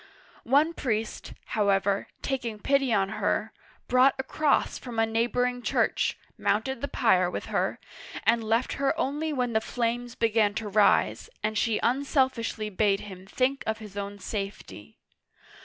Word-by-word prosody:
One 300 +5 +4
priest, 225 -7 -3
how 210 -2 0
ever, 195 0 +1 0.2
taking 240 -5 -2
pity 270 +3 +1
on 195 -3 +2
her, 215 +2 0 0.3
brought 255 +2 +5
a 265 - -2
cross 295 +2 +1
from 245 -3 -8
a 225 - +4
neighboring 245 +2 0
church, - - +1 0.2
mounted 220 +5 0
the 280 - -1
pyre 185 -10 +3
with - - -5
her, - - 0 0.5
and 230 0 +3
left 225 +3 +1
her 275 - +1
only 300 +4 -1
when 250 -4 -1
the 220 - +2
flames 240 +1 -2
began 220 -2 +2
to 220 -1 -3
rise 205 - +3
and 215 0 -1
she 215 0 +1
unself 265 +1 +2
ishly 215 -3 -4
bade 200 0 +2
him 190 -2 -10
think 260 +6 0
of 220 0 0
his 210 -3 -11
own 200 0 -5
safety. 195 - -6
225 Hz, 155 wpm, -27 LUFS, 210-255 Hz, 0.5 s, brought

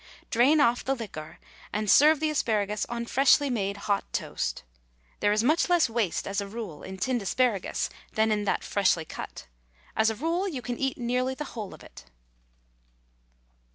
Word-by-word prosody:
Drain 260 +7 +5
off 245 -4 +3
the 270 - 0
liquor 185 -10 -8 0.3
and 210 0 -2
serve 300 +8 +6
the 310 0 0
asparagus 210 -7 0
on 235 0 -4
freshly 275 +2 +4
made 200 -4 -1
hot 200 -1 +1
toast. - - -3 0.6
There 205 - +2
is 215 +1 +2
much 310 +8 +2
less 340 -9 +3
waste 225 -6 -1
as 200 +1 -1
a 200 - -5
rule 200 -8 -7
in 190 0 -8
tinned 245 +4 0
asparagus 205 0 0 0.3
than 220 0 +2
in 210 -1 0
that - - 0
freshly 185 -5 +1
cut. - - -8 0.5
As 220 0 +3
a 225 - -2
rule, 335 - -1
you 275 -10 -5
can 245 +1 -4
eat 270 -1 -1
nearly 250 +2 -1
the 300 - -4
whole 215 -5 -6
of - - -16
it. - - -14
235 Hz, 175 wpm, -27 LUFS, 205-265 Hz, 0.6 s, serve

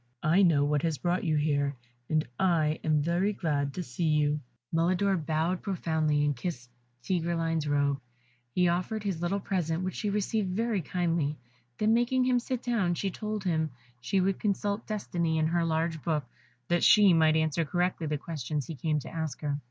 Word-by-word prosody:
"I 170 +6 +4
know 160 -7 +4
what 145 -1 +1
has 160 -2 0
brought 175 +3 0
you 160 -3 +1
here, 145 -2 +1 0.3
and 155 0 +1
I 160 -4 +2
am 155 -2 +2
very 175 +6 +1
glad 145 -6 -1
to 180 - -3
see 140 +4 -3
you." 150 -1 +2 0.3
Mulidor 185 +4 +2
bowed 160 +2 -1
profoundly, 160 -6 0
and 145 -1 +1
kissed 120 -4 -5 0.3
Tigreline's 165 -1 0
robe. 140 -1 +1 0.5
He 180 -1 +4
offered 185 +5 -1
his 190 -5 -2
little 185 +3 0
present, 180 -3 -1
which 185 -1 -2
she 210 - -2
received 205 0 0
very 225 -2 0
kindly, 165 -3 -1 0.4
then 215 +1 +3
making 245 +2 +2
him 250 -1 +3
sit 250 0 -4
down, 210 -8 +1
she 195 +2 -2
told 215 +1 -4
him 160 -4 0 0.3
she 190 +10 0
would 190 0 +1
consult 205 +1 -1
Destiny 170 -6 -1
in 155 - +2
her 170 +1 +1
large 160 -1 -1
book, 150 -3 -1 0.4
that 175 0 +1
she 205 -4 +7
might 160 -1 +4
answer 160 +1 +1
correctly 175 +1 -1
the 150 0 -1
questions 150 -2 -4
he 165 - -6
came 155 +2 -1
to - - -9
ask 160 -4 -3
her. 145 -1 -1
165 Hz, 185 wpm, -29 LUFS, 155-190 Hz, 0.5 s, she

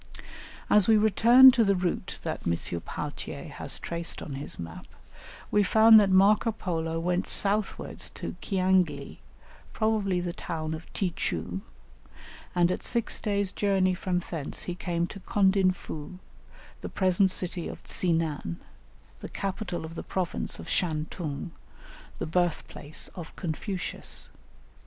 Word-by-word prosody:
As 210 -3 +5
we 220 -1 +6
return 235 +5 +8
to 240 -2 +3
the 200 -2 +3
route 180 -1 -2
that - - -3
M. 85 0 -1
Pauthier - - -6
has - - -4
traced 170 0 -3
on 145 - -6
his 140 +2 -5
map, 85 -1 -8 0.6
we 210 - +4
find 220 +3 +7
that 200 -2 +3
Marco 205 +4 +5
Polo 165 -5 -2
went 180 +2 0
southwards 205 +1 -2
to - - -5
Ciangli, 185 -7 +1 0.5
probably 215 -4 +1
the 175 -1 -3
town 160 -3 -4
of 160 +1 -8
Ti 180 -4 -1
choo, 90 +3 -3 0.9
and 175 0 +4
at - - -2
six 235 -2 0
days' 200 -2 0
journey 190 -2 +2
from 180 0 -1
thence 155 -5 -4
he 180 - -3
came 175 -1 -1
to 195 - -8
Condinfoo, 190 -5 0 0.6
the - - -5
present 190 0 +3
city 180 -2 -3
of - - -8
Tsi 180 - -1
nan, 155 - -1 0.6
the - - -7
capital 195 -3 -4
of 160 - -8
the - - -5
province 185 -3 -2
of - - -9
Shan 160 -2 0
tung, 155 -1 -5 0.7
the - - -3
birthplace 160 -3 -1
of 170 -3 -9
Confucius. 180 +3 -4
180 Hz, 140 wpm, -28 LUFS, 165-200 Hz, 0.9 s, return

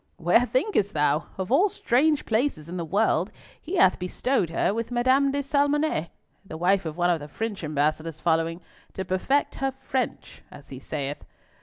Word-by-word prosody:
"Where 180 +9 +3
thinkest 255 - 0
thou? 150 +1 +1
Of 190 +2 -4
all 360 +10 +4
strange 295 0 +1
places 220 - 0
in 175 - -7
the 170 - -2
world, 200 +7 +1 0.3
he 345 +5 -5
hath 190 - +4
bestowed 180 - -1
her 170 +3 0
with 230 +1 -3
Madame 260 +3 +3
de 285 +1 -1
Salmonnet, 285 - +1 0.3
the 160 -5 -8
wife 185 +1 +2
of 155 +1 -6
one 175 0 +2
of 170 - 0
the 145 - -8
French 210 +5 -5
Ambassador's 155 +1 -1
following, 165 +1 0 0.3
to 190 - -4
perfect 190 +11 0
her 270 0 +1
French, 260 -2 -3
as 145 - -14
he 130 - -8
saith. 145 0 -5
190 Hz, 175 wpm, -25 LUFS, 165-265 Hz, 0.3 s, all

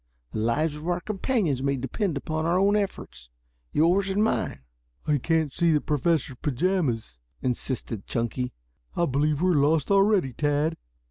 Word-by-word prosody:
The - - -3
lives 145 +8 +1
of 155 +3 -8
our 175 0 +1
companions 195 - -1
may 140 0 +1
depend 145 - -2
upon 155 +1 -3
our 170 +2 +2
own 200 +2 +3
efforts 195 - -4 0.4
yours 180 +6 +3
and 200 +2 +2
mine." 220 - -1 0.4
"I 150 -1 +2
can't 160 0 0
see 170 -1 +2
the 150 - +4
Professor's 150 -2 0
pajamas," 145 - -1 0.2
insisted 125 -4 -3
Chunky. 125 +2 -2 0.4
"I 170 - +2
believe 150 +2 +1
we 185 - +4
are - - +3
lost 150 +3 +2
already, 195 - +3
Tad." 150 +3 0
155 Hz, 155 wpm, -26 LUFS, 135-180 Hz, 0.4 s, the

